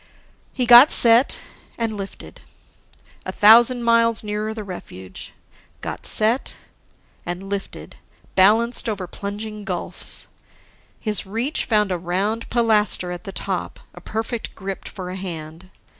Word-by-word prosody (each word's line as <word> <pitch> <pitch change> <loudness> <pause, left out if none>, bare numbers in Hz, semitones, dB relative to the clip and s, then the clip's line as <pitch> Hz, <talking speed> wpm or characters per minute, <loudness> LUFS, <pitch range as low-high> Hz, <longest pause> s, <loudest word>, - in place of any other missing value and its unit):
He 250 - 0
got 240 +4 +9
set... 235 +3 +5 0.4
and 225 -2 -2
lifted. 195 -1 -9 0.8
A - - -5
thousand 235 +3 +5
miles 230 -1 +2
nearer 210 +1 -3
the 220 -1 -6
refuge! 95 - -10 0.5
Got - - -6
set... 225 +4 +2 0.7
and 175 +2 -5
lifted, 195 0 -6 0.4
balanced 225 +5 +4
over 200 -4 -4
plunging 210 +3 -7
gulfs. 185 -4 -4 0.7
His 210 -3 -1
reach 230 +9 -2
found 210 -3 +1
a 180 - -2
round 195 +6 -2
pilaster 215 -6 +2
at 180 +4 -8
the 195 - -5
top, - - -4
a - - -13
perfect 225 +1 -5
grip 195 0 -7
for 180 -2 -7
a - - -6
hand. 170 -1 -8
210 Hz, 130 wpm, -21 LUFS, 190-230 Hz, 0.8 s, got